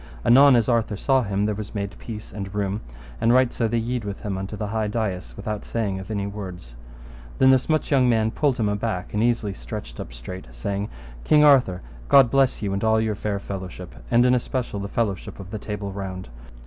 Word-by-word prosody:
Anon 135 +2 +7
as 115 -2 +3
Arthur 115 -4 +1
saw 135 +4 +3
him 100 -2 -1
there 105 - 0
was 105 +1 -7
made 100 0 -3
peace 110 -4 -8
and 100 -1 -6
room, 100 +1 -1 0.4
and 115 - +4
right 130 0 +4
so 115 - 0
they 115 +2 0
yede 120 +1 -2
with 100 -1 -5
him 100 -2 -3
unto 95 +3 -5
the 105 - -3
high 110 +1 -1
dais, 95 - -3
without 105 -1 -4
saying 100 -5 -2
of 95 - -9
any 100 -2 -2
words. 95 -11 -7 0.6
Then 130 0 +6
this 130 +2 +2
much 155 -1 +1
young 130 -3 +4
man 110 -2 +2
pulled 140 0 +1
him 110 - +1
aback, 105 -3 -2
and 105 - +1
easily 115 -3 +1
stretched - - -7
up - - -6
straight, - - -8
saying, 100 - -3 0.3
King 150 -1 +5
Arthur, 130 -11 +5 0.3
God 135 -2 +8
you - - -16
bless 135 -5 +2
and 100 0 -1
all 110 0 +3
your 110 -1 0
fair 100 0 -2
fellowship, 95 -2 -7 0.2
and 120 +1 +4
in 125 - +5
especial 125 -3 -1
the 100 - -4
fellowship 105 -4 -2
of 95 -1 -9
the 110 - -4
Table 100 -1 -5
Round. 95 -5 -6
105 Hz, 215 wpm, -24 LUFS, 100-120 Hz, 0.6 s, God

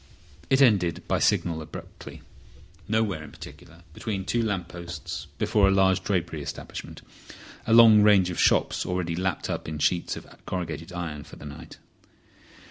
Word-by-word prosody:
It 135 +1 +5
ended 90 - +2
by - - +1
signal 80 -2 +1
abruptly, 75 - -10 0.6
nowhere 105 -6 0
in 75 - -10
particular, 85 +1 -13
between 95 0 -4
two 120 +6 0
lamp 100 -6 -2
posts 85 -3 -7
before 100 -2 +3
a - - +4
large 95 -1 +3
drapery 85 -5 -1
establishment—a 90 - -9
long 115 -2 +8
range 100 -4 +5
of - - -5
shops - - +3
already 90 -2 -2
lapped 90 -2 -2
up - - -4
in 80 - -5
sheets 85 +3 0
of - - -9 0.2
corrugated 85 -1 -4
iron 80 -5 -5
for - - -13
the - - -12
night. 75 0 -10
90 Hz, 150 wpm, -26 LUFS, 85-100 Hz, 0.6 s, long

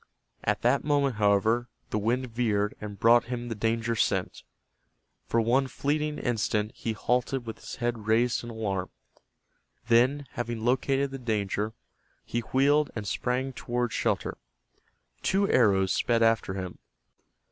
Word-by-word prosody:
At - - 0
that 125 +4 +3
moment, 140 -5 +1
however, 110 +4 +2 0.2
the 105 - 0
wind 120 +5 0
veered 105 -3 0
and 105 -2 -7
brought 120 +1 +5
him 120 0 -4
the - - -2
danger 115 +2 0
scent. - - 0 0.9
For 115 - +2
one 125 +4 +2
fleeting 150 +3 -1
instant 110 -3 0
he 115 - -3
halted 125 +3 0
with 115 - -7
his - - -8
head 120 -3 -3
raised 115 +3 +2
in 120 - -7
alarm. 100 -5 -3 1.0
Then, 130 +5 +4
having 120 -3 -4
located 135 +2 +1
the 135 - -6
danger, 105 -2 -1 0.5
he 120 - -2
wheeled 140 +5 +2
and 105 -2 -4
sprang 130 +6 -1
toward 120 -1 -2
shelter. - - -1 0.8
Two 195 +1 +2
arrows 95 - +3
sped 115 -1 +2
after 115 -4 +2
him. 95 -2 -6
120 Hz, 140 wpm, -28 LUFS, 110-125 Hz, 1.0 s, brought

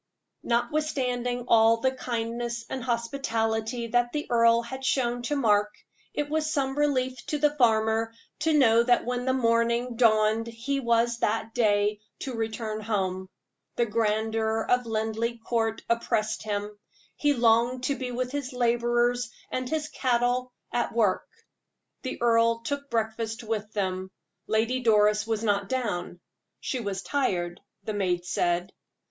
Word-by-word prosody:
Notwithstanding 245 -1 -1
all 225 0 +5
the 260 +3 +1
kindness 235 -1 -3
and 260 - -3
hospitality 235 -2 -1
that 240 +1 +2
the 300 0 -2
earl 230 0 +4
had 265 +3 -7
shown 245 -2 +1
to 265 +5 -2
Mark, 210 -6 +2 0.4
it 295 - -1
was 310 +1 0
some 270 -3 0
relief 260 -4 0
to 300 - -1
the 295 0 +2
farmer 225 -3 +2 0.3
to 320 +1 +1
know 230 -4 +5
that 245 0 +3
when 245 0 -2
morning 235 -1 +1
dawned 220 -1 +3
he 235 +5 -3
was 235 -1 +1
that 225 +1 -1
day 210 -2 +2 0.2
to 265 - -4
return 220 -1 -3
home. 190 -3 -2 0.5
The 235 - +2
grandeur 220 0 0
of 250 -1 +2
Linleigh 225 +1 -1
Court 225 -1 -1
oppressed 220 -2 0
him; 210 0 -3 0.4
he 290 -1 +2
longed 240 +1 +3
to 280 +2 +1
be 255 -2 -4
with 250 +1 -3
his 280 -2 -4
laborers 240 0 +1 0.2
and 255 -1 -2
his 310 0 -1
cattle, 250 -1 0 0.2
at 240 -1 -1
work. 210 -5 +2 0.7
The 260 - -5
earl 230 0 +3
took 280 +2 -4
breakfast 225 0 -2
with 215 -1 -3
them; 190 -2 -2 0.4
Lady 225 +4 +1
Doris 210 -2 +3
was 225 -1 -1
not 200 -2 +1
down 205 -9 -2 0.4
"she 260 - -3
was 200 -4 -4
tired," 180 -11 -1 0.2
the 215 - -3
maid 180 -3 0
said. 175 0 0
230 Hz, 140 wpm, -27 LUFS, 220-250 Hz, 0.7 s, all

